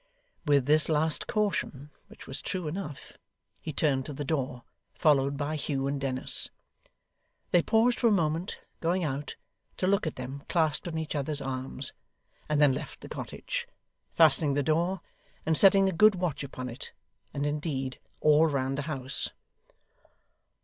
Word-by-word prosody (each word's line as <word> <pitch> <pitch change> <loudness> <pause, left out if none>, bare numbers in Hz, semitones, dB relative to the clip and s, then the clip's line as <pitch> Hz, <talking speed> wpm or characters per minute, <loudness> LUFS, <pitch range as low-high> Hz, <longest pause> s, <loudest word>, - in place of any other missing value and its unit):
With 140 -3 +4
this 155 +3 +6
last 155 0 +1
caution, 150 -9 -1 0.2
which - - -13
was 135 - -4
true 185 -4 -3
enough, 150 -3 -6 0.4
he 155 - -5
turned 135 -3 +1
to 150 - -5
the 145 +1 -5
door, 135 -5 -2 0.3
followed 140 -3 +3
by 145 +2 -2
Hugh 140 -2 -2
and 140 0 -2
Dennis. 130 -1 0 1.0
They 175 - +5
paused 225 +5 +3
for 240 - +4
a - - +4
moment, 170 -1 0 0.2
going 175 +2 0
out, 145 -1 -3 0.4
to - - 0
look 200 -1 +2
at 155 - -3
them 130 +2 -6
clasped 160 -2 +1
in 165 -2 -3
each 160 -1 -3
other's 145 0 -1
arms, 130 0 -4 0.6
and 150 -1 +2
then 145 -3 +6
left - - -6
the - - -9
cottage; - - -5 0.5
fastening 150 -3 +5
the 145 - +1
door, 170 +5 +1 0.4
and 160 - +2
setting 195 +2 +6
a - - +2
good 210 +4 +6
watch 175 -6 -2
upon 130 -2 -6
it, 120 +1 -7 0.4
and 140 0 -2
indeed 145 -3 -2 0.2
all 155 +1 +5
round 135 -2 -1
the 145 +2 -4
house. 135 -2 -2
150 Hz, 160 wpm, -29 LUFS, 135-165 Hz, 1.0 s, this